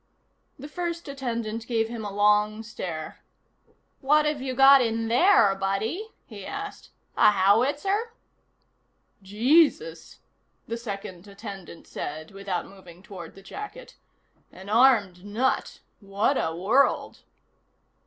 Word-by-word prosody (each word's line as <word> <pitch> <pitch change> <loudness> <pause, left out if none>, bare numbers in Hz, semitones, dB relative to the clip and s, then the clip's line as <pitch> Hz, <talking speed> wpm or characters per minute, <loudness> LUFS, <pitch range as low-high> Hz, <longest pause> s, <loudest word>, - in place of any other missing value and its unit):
The 285 - -9
first 340 +1 -5
attendant 235 -5 -4
gave 225 -2 0
him 230 -1 -6
a 205 - -5
long 210 +2 +2
stare. 170 -8 -7 0.8
"What've 300 +1 +2
you 260 -1 -4
got 270 +1 +7
in 225 -1 -1
there, 240 - +5
buddy?" 200 - -3 0.2
he 205 -4 -10
asked. 410 - -7 0.3
"A - - +6
howitzer?" 280 - +1 1.1
"Jesus," 290 - +1 0.5
the 230 - -4
second 200 -5 -7
attendant 200 -4 -10
said, 155 +2 -7
without 195 -2 -4
moving 185 -2 -15
toward 180 -4 -10
the 195 - -14
jacket. 420 - -9 0.6
"An 190 +2 -12
armed 215 -6 +3
nut. 225 +6 -2 0.2
What 200 +6 0
a 160 -9 -1
world." 225 +11 +1
225 Hz, 115 wpm, -25 LUFS, 195-275 Hz, 1.1 s, got